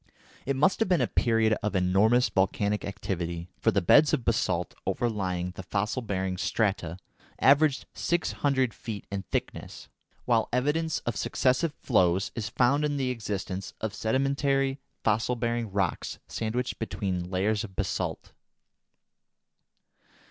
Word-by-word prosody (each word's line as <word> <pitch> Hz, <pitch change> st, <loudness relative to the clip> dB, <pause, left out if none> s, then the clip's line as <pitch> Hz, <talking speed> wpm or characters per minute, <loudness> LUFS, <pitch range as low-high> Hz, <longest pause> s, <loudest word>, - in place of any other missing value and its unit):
It 140 Hz, -, +1 dB
must 150 Hz, +8 st, +3 dB
have 225 Hz, -, +1 dB
been 180 Hz, -3 st, +4 dB
a 125 Hz, -, +3 dB
period 115 Hz, -2 st, +2 dB
of 105 Hz, -1 st, -2 dB
enormous 100 Hz, +7 st, +4 dB
volcanic 100 Hz, +1 st, 0 dB
activity, 85 Hz, -4 st, -4 dB
for -, -, +3 dB
the 100 Hz, -, +1 dB
beds 150 Hz, -, +6 dB
of 120 Hz, -, 0 dB
basalt 90 Hz, -6 st, 0 dB
overlying 95 Hz, -6 st, -1 dB
the 95 Hz, -, -8 dB
fossil 105 Hz, +6 st, -2 dB
bearing 95 Hz, -4 st, -2 dB
strata 95 Hz, -5 st, -1 dB, 0.4 s
averaged 145 Hz, +1 st, +4 dB
six 175 Hz, -1 st, 0 dB
hundred 130 Hz, -5 st, +1 dB
feet 110 Hz, -3 st, -7 dB
in 100 Hz, -1 st, -2 dB
thickness, -, -, -4 dB, 0.4 s
while 115 Hz, -2 st, +2 dB
evidence 150 Hz, +5 st, +1 dB
of 120 Hz, -, -3 dB
successive 130 Hz, +4 st, +1 dB
flows 95 Hz, -5 st, +2 dB
is 115 Hz, -3 st, -4 dB
found 140 Hz, +4 st, +2 dB
in 145 Hz, -1 st, 0 dB
the 130 Hz, -2 st, 0 dB
existence 100 Hz, -5 st, -4 dB
of 110 Hz, -2 st, -3 dB
sedimentary 135 Hz, +4 st, +1 dB, 0.2 s
fossil 110 Hz, +3 st, +1 dB
bearing 115 Hz, -2 st, -2 dB
rocks 95 Hz, -3 st, -1 dB
sandwiched 120 Hz, +3 st, -3 dB
between 95 Hz, -5 st, -3 dB
layers 100 Hz, +4 st, 0 dB
of 95 Hz, -4 st, -9 dB
basalt. -, -, -3 dB
110 Hz, 135 wpm, -28 LUFS, 95-130 Hz, 0.4 s, beds